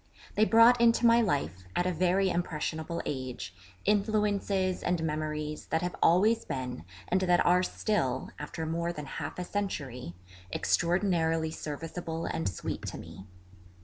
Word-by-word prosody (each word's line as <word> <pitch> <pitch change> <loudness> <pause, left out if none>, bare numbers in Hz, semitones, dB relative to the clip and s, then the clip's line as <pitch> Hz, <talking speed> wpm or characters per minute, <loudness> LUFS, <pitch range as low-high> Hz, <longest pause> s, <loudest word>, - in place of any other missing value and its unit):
They 215 - +4
brought 230 +2 +6
into 235 0 +4
my 235 0 +6
life, 115 - -1
at 175 - +1
a 185 - +1
very 185 +3 +2
impressionable 165 0 -2
age, 130 -8 -4 0.3
influences 205 -2 +1
and 175 -2 0
memories 150 -1 -3
that 160 +1 0
have 180 - -2
always 210 +7 +4
been, 125 - -5 0.2
and 185 +1 +1
that 180 -1 +3
are 180 +1 +5
still, 185 - -1
after 160 +2 -5
more 170 +2 -1
than 150 -3 -6
half 135 - -5
a 180 - -2
century, 140 - -4 0.4
extraordinarily 165 -3 +1
serviceable 165 +2 -5
and 165 - -1
sweet 90 - -5
to - - -5
me. 95 - -10
170 Hz, 145 wpm, -30 LUFS, 150-195 Hz, 0.4 s, brought